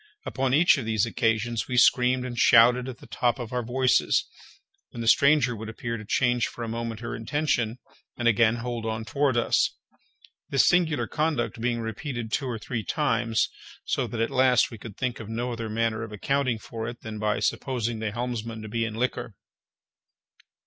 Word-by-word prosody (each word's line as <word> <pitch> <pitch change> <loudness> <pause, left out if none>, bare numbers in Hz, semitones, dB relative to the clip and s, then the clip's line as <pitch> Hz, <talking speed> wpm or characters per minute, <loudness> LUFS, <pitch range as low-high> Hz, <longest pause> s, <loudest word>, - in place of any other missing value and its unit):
Upon 130 -1 -1
each 165 -2 +5
of 125 - -5
these 110 -1 +1
occasions 115 0 0
we 125 - -2
screamed 125 +1 +4
and 125 -1 -5
shouted 120 +2 +5
at 125 - -8
the - - -15
top 120 +1 0
of 120 -2 -7
our 125 - 0
voices, 125 +2 +2 0.6
when 120 - -10
the 115 - -3
stranger 140 -1 +4
would 110 0 -7
appear 115 +1 -4
to 110 - -7
change 120 +2 +1
for 120 - -7
a - - -4
moment 115 0 -4
her 120 0 -4
intention, 120 -1 -1 0.4
and 120 - 0
again 115 0 +4
hold 120 -1 -4
on 110 0 -3
toward 135 +2 +1
us—this 130 +3 -1
singular 170 -4 +2
conduct 130 -8 -1
being 120 -1 0
repeated 115 +1 -5
two 135 - -1
or 120 -2 -3
three 110 0 -4
times, 115 -7 +1 0.4
so - - -1
that 115 - -4
at 115 - 0
last 130 -1 +3
we 115 - -9
could 105 -1 -10
think 125 -2 -2
of 110 -2 -8
no 120 +2 -2
other 115 -2 -4
manner 115 0 -1
of 115 -2 -6
accounting 130 +3 0
for 110 0 -6
it 120 0 -7
than 110 -1 -7
by 105 -1 0
supposing 120 -4 -1
the 110 -1 -2
helmsman 115 -1 -4
to - - -7
be 115 +2 -1
in 110 -1 -5
liquor. 125 +2 -2
120 Hz, 190 wpm, -26 LUFS, 115-125 Hz, 0.6 s, each